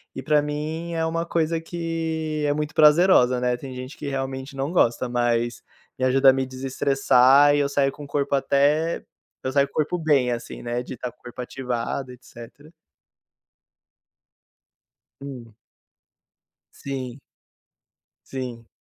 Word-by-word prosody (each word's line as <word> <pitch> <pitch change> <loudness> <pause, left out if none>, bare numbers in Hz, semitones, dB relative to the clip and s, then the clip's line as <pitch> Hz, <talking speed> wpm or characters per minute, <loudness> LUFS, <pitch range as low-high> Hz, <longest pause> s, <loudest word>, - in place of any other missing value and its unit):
e 130 - -6
para 150 +1 +3
mim 155 +3 -4
é 165 0 0
uma 165 +1 -1
coisa 165 -1 0
que 160 -2 -3
é 145 - +2
muito 150 +1 -3
prazerosa, 150 -5 +5
né. 125 -1 +1
Tem 130 0 -8
gente 130 +2 -8
que 145 - -6
realmente 135 0 -4
não 135 +4 -2
gosta, 120 -6 +2
mas 120 -1 0 0.4
me 130 - +1
ajuda 135 +1 +5
a - - +6
me 135 0 -1
desestressar, 135 +1 +4
e 145 - +2
eu 140 - +2
saio 140 -1 +1
com 145 +1 -10
o - - -12
corpo 140 0 -1
até 145 +4 +1 0.4
eu 130 - -2
saio 140 0 +3
com - - -27
o - - -30
corpo 155 +3 0
bem 145 -6 +2
assim, 120 -1 -5
né, 120 +1 -2
de - - -8
estar 125 0 -6
com 125 - -35
o - - -38
corpo 120 +1 -8
ativado, 125 +1 -4
etcétera. 130 +4 -14 2.5
Hum. 125 -5 -9 1.2
Sim. 130 -1 -6 1.1
Sim. 125 -3 -6
135 Hz, 155 wpm, -24 LUFS, 125-150 Hz, 2.5 s, a